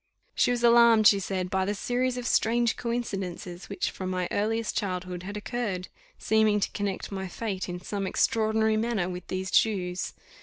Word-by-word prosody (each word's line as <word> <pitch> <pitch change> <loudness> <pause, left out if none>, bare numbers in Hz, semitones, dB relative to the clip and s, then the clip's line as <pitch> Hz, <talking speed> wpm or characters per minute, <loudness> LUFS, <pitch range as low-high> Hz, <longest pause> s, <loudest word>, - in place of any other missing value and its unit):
She - - +2
was 245 -1 0
alarmed, 235 -2 +6
she 200 -1 +7
said, 185 -1 -3
by 190 0 +1
the 205 +2 -1
series 250 +3 -1
of 245 - -4
strange 235 0 +2
coincidences 195 -7 -4
which, 200 - -2
from 185 -1 -5
my 185 -1 -1
earliest 225 +2 -1
childhood, 185 -3 -3
had 200 +3 -6
occurred, 210 -5 -3 0.3
seeming 220 -1 +3
to - - -1
connect 200 -1 -3
my 190 -1 -4
fate, 190 -1 -4
in 180 0 -4
some 195 +1 -3
extraordinary 220 +1 +2
manner, 220 -5 0
with 180 -1 -6
these 185 0 -3
Jews. 185 -5 +1
205 Hz, 175 wpm, -27 LUFS, 185-225 Hz, 0.3 s, she